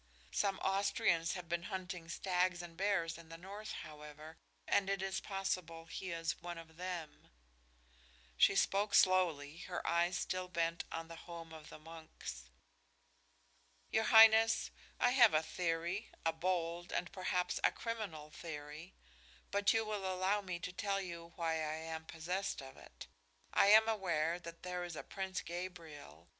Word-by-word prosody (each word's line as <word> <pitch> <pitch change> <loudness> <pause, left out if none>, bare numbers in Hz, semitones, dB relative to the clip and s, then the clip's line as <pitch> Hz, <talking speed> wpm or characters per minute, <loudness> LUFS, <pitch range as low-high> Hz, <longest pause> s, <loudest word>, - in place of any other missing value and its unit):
Some 195 - +1
Austrians 195 -3 +2
had 180 -2 -6
been 170 0 -1
hunting 180 -3 -5
stags 180 0 0
and 170 -1 -10
bears 170 -3 0
in 165 -1 -14
the 165 - -8
north, 205 +4 -7
however, 150 +1 -11 0.3
and 195 -1 +3
it 195 0 +1
is 190 0 -1
possible 185 -4 -3
he 185 +2 -6
is 165 -1 -2
one 175 0 -5
of 160 -1 -12
them." 175 -4 -6 1.1
She 130 - +5
spoke 200 +1 +2
slowly, 165 -6 +4
her 180 - -4
eyes 175 +1 +2
still 185 0 -2
bent 170 -1 -1
on 165 0 -4
the 165 - -8
home 165 -1 -8
of 155 -1 -10
the - - -9
monks. 160 - -9 1.4
"Your 220 0 +2
highness, 225 0 +7 0.3
I 245 - +4
have 240 -9 +7
a 155 - +4
theory, 170 +5 -2 0.2
a 165 - +3
bold 175 0 -1
and 180 - -2
perhaps 185 -1 0
a - - +5
criminal 200 -10 -5
theory, 150 +2 -8 0.6
but 200 0 +3
you 225 0 +2
will 205 -3 -2
allow 190 +3 +1
me 185 -3 -4
to 180 - -4
tell 200 +1 0
you 170 -3 -6
why 165 -2 0
I 155 0 -1
am 160 0 -5
possessed 180 +5 -3
of 135 -1 -9
it. - - -12 0.5
I - - +5
am 220 +2 +8
aware 175 -6 +1
that 170 -1 -10
there 180 0 -3
is 175 -2 -5
a - - -5
Prince 190 -1 -4
Gabriel. 165 - -8
175 Hz, 160 wpm, -36 LUFS, 165-195 Hz, 1.4 s, am